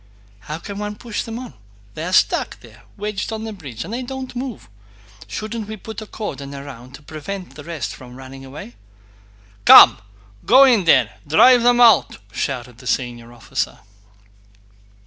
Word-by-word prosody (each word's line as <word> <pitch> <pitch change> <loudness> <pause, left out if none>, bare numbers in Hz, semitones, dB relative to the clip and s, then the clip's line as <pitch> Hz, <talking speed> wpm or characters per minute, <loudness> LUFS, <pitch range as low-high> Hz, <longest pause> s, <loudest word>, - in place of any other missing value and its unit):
"How 150 +10 -6
can 200 +4 -8
one 210 0 -4
push 230 0 -5
on? 230 - -7 0.4
They 155 - -6
are 180 - -4
stuck - - +2
there, - - -16 0.2
wedged 210 0 -4
on 220 0 -5
the 220 -1 -5
bridge, 140 - -8
and 240 +6 -5
don't 265 -1 -7
move. 250 -3 -6 0.6
Shouldn't 215 - -5
we 220 0 -7
put 220 +3 -8
a 215 - -9
cordon 140 -12 -6
round 135 -2 -10
to 150 - -15
prevent 180 +6 -7
the 150 - -11
rest 165 -4 -5
from 125 -1 -12
running 135 +1 -11
away?" 135 -3 -10 0.9
"Come, - - +9 0.4
go 260 +4 +7
in 235 -9 +4
there 125 -10 +4
and - - -27
drive 245 +10 +6
them 240 0 +4
out!" 230 -6 +5
shouted 125 -2 -4
the 125 - -11
senior 120 -2 -3
officer. 120 -2 -4
180 Hz, 165 wpm, -20 LUFS, 135-225 Hz, 0.9 s, Come